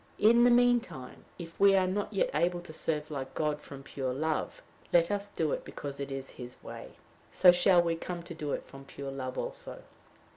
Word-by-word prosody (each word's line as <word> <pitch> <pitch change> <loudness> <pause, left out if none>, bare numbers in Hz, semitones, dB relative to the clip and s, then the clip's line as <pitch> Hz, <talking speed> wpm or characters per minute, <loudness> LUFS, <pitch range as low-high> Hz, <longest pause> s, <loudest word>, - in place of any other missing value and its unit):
In 235 +3 +6
the - - +7
mean 245 0 +5
time, 130 - -11
if 165 -2 -10
we 200 0 +6
are 190 -1 +4
not 195 +3 -2
yet - - +1
able 175 0 +1
to 175 -2 -11
serve 155 -1 -2
like 135 -2 -5
God 150 -1 -1
from 135 -1 -10
pure 130 -2 -3
love, 155 +2 -2 0.3
let 170 +2 +4
us 205 0 -2
do 160 -6 -1
it - - -2
because 140 -1 -7
it 140 0 -4
is 135 0 -5
his 125 0 -9
way; - - -9 0.4
so 180 - +7
shall 175 0 +5
we 170 -1 0
come 175 +1 -6
to 170 - -8
do 150 -3 -4
it - - -4
from 135 0 -12
pure 135 0 -7
love 130 -1 -5
also. - - -5
165 Hz, 215 wpm, -30 LUFS, 140-185 Hz, 0.4 s, the